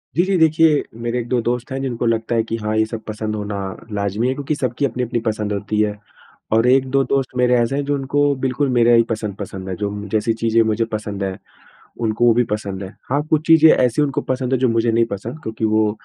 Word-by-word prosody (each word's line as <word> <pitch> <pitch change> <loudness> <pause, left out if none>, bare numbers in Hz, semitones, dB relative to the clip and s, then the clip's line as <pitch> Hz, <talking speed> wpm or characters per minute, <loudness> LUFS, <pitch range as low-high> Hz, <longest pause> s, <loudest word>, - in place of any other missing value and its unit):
जी, 175 - +4
जी। 190 +1 0
देखिए, 160 -1 +4 0.2
मेरे 120 +1 -1
1-2 120 +1 -1
दोस्त 120 +2 -2
हैं 135 0 -3
जिनको 120 -3 -2
लगता 115 0 0
है 115 - +2
कि 115 0 -4
हाँ, 110 -1 -2
ये 110 - +3
सब 110 0 -6
पसंद 110 0 -3
होना 105 -1 -4 0.4
लाज़मी 100 +3 -1
है 130 - +1
क्योंकि 145 +2 -3
सबकी 130 0 -1
अपनी-अपनी 125 -1 -2
पसंद 105 -2 -1
होती 105 +1 -2
है। 105 -1 -1 0.5
और 115 +2 +3
1-2 135 +1 +3
दोस्त 135 -1 0
मेरे 125 0 +3
ऐसे 120 +2 +1
हैं 145 - -1
जो 145 0 0
उनको 145 +1 +1
बिल्कुल 130 +2 0
मेरा 120 0 +5
ही 115 - +6
पसंद, 110 -3 -3
पसंद 95 -1 -6
है 95 - -3
जो 100 - -1 0.2
जैसी 110 +2 +1
चीजें 115 0 +2
मुझे 110 +1 0
पसंद 105 -2 -3
है 95 -1 -3 0.7
उनको 110 +1 +1
वो 120 - +6
भी 120 +1 +3
पसंद 100 -2 -5
है। 95 - -6 0.2
हाँ, 145 +3 +1
कुछ 155 0 +1
चीजें 160 -1 +7
ऐसी 125 +3 +2
उनको 140 -2 0
पसंद 130 0 -3
है 130 - +3
जो 130 0 +2
मुझे 115 0 +1
नहीं 115 +1 +3
पसंद 115 +9 -6
क्योंकि 110 0 -4
वो 110 0 +2
115 Hz, 230 wpm, -20 LUFS, 110-130 Hz, 0.7 s, चीजें